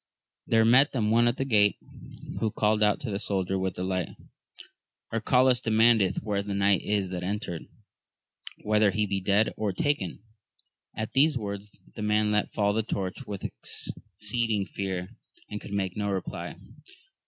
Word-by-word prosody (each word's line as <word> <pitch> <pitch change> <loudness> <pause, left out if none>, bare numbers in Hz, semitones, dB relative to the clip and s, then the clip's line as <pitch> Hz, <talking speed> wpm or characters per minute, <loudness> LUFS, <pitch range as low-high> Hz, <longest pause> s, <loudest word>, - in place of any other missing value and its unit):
There 115 -1 +4
met 125 +5 +5
them 110 -5 +1
one 120 +1 +4
at 120 - +1
the 135 - -1
grate, 105 -5 +3 0.6
who 110 - +1
called 105 +1 +1
out 105 -1 +3
to 120 - -4
the 100 - -2
soldier 95 -2 -1
with 95 -1 -2
the 90 - -4
light, 95 -2 -1 1.0
Arcalaus 125 +2 +3
demandeth 110 -4 +3
where 100 -2 -1
the 100 0 -4
knight 100 -1 +3
is 100 -3 0
that 90 -1 -4
entered? 90 -3 -4 1.0
whether 105 0 +3
he 105 +2 0
be 100 -1 -2
dead 100 +3 +2
or 105 -2 0
taken 95 - 0 0.8
1 110 - -3
At 110 - -5
these 145 +1 +4
words 100 -1 -6 0.2
the 110 - -7
man 105 0 +2
let 105 0 +1
fall 100 -1 +1
the 110 - +1
torch 100 +3 -4
with 100 -2 -6
exceeding 110 +1 -2
fear, 95 -2 -4 0.4
and 105 - -5
could - - -10
make 95 -2 -1
no 105 -1 -1
reply. 95 -2 -4
105 Hz, 165 wpm, -27 LUFS, 100-110 Hz, 1.0 s, met